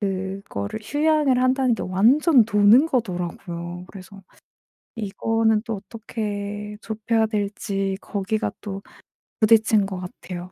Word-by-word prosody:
그거를 190 - -4
휴양을 290 -1 +2
한다는 255 -1 +3
게 - - -5
완전 240 - +4
노는 210 +8 +6
거더라고요. 175 - -3
그래서 195 0 -12 0.7
이거는 220 +1 +1
또 225 -2 -2
어떻게 210 0 -5
좁혀야 220 +1 0
될지 200 -2 -2
거기가 215 +2 -2
또 195 -1 -6 0.6
부딪힌 215 -2 +5
것 190 -2 -5
같아요 180 0 -8
210 Hz, 255 characters per minute, -23 LUFS, 195-225 Hz, 0.7 s, 노는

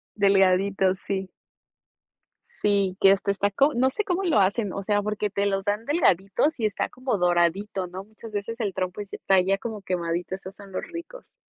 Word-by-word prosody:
Delgaditos, 195 -1 +3
sí. 190 -1 -2 1.2
Sí, 200 - 0
que 195 - +8
hasta 195 0 +2
está 200 +1 0
co 280 +9 +3
no 255 +2 +3
sé 425 +11 -2
cómo 385 -1 -1
lo 330 - +3
hacen. 200 0 +1
O 200 - -4
sea, 205 +1 +1
porque 210 0 -2
te 200 0 -1
los 195 -1 0
dan 210 +2 -1
delgaditos, 245 - +2
y 220 - 0
está 210 -3 -1
como 255 -3 -2
doradito, 180 +2 +1
¿no? 185 +2 -7
Muchas 215 +1 -13
veces 230 +4 -4
el 205 -4 -1
trompo, 185 +1 -3
está 195 -1 +1
ya, 195 +2 +1
como 215 0 -6
quemadito. 175 -1 -2
Esos 190 0 -10
son 200 -1 -13
los 185 - -4
ricos. 365 +9 -10
200 Hz, 190 wpm, -25 LUFS, 190-220 Hz, 1.2 s, que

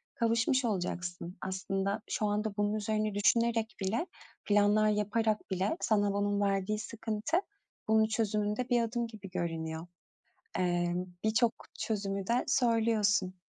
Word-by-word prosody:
kavuşmuş 230 +3 +2
olacaksın. 180 -3 -3
Aslında 195 +1 -2
şu 215 - 0
anda 210 +1 -1
bunun 205 0 +1
üzerine 215 0 -1
düşünerek 225 +1 +2
bile, 220 - 0 0.4
planlar 205 +1 +4
yaparak 210 +1 0
bile 190 - 0
sana 205 -3 +2
onun 205 0 +1
verdiği 200 +1 +1
sıkıntı 225 - -1 0.5
bunun 220 0 +4
çözümünde 215 +1 -1
bir 240 -1 +4
adım 235 +1 -1
gibi 210 -4 -10
görünüyor. 165 -1 -3 0.7
Eee, 175 -1 +1 0.3
birçok 225 +2 +3 0.3
çözümü 195 -3 -2
de 235 +3 +1
söylüyorsun. 225 -7 +2
210 Hz, 120 wpm, -31 LUFS, 195-225 Hz, 0.7 s, planlar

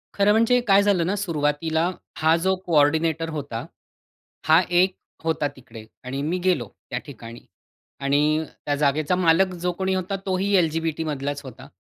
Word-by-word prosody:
खरं 200 +1 +4
म्हणजे 230 +3 +4
काय 200 0 +5
झालं 190 -5 +2
ना, 195 +3 0
सुरुवातीला 160 -2 0 0.3
हा 160 +1 +3
जो 190 0 +2
कोऑर्डिनेटर 160 +1 +2
होता, 140 -7 -5 0.8
हा 160 +3 +6
एक 180 +1 +3 0.3
होता 160 -2 0
तिकडे. 115 -4 -12 0.2
आणि 135 +2 -4
मी 165 +5 -1
गेलो 185 -1 +1 0.2
त्या - - -2
ठिकाणी. 115 -4 -10 0.6
आणि 150 +3 +2 0.2
त्या 145 - 0
जागेचा 150 +4 +1
मालक, 180 +1 +3
जो 180 0 -2
कोणी 190 +2 -2
होता, 185 +2 -2
तोही 195 +1 0
LGBT 160 0 -2
मधलाच 145 -1 -3
होता 130 -4 -11
160 Hz, 150 wpm, -23 LUFS, 145-185 Hz, 0.8 s, हा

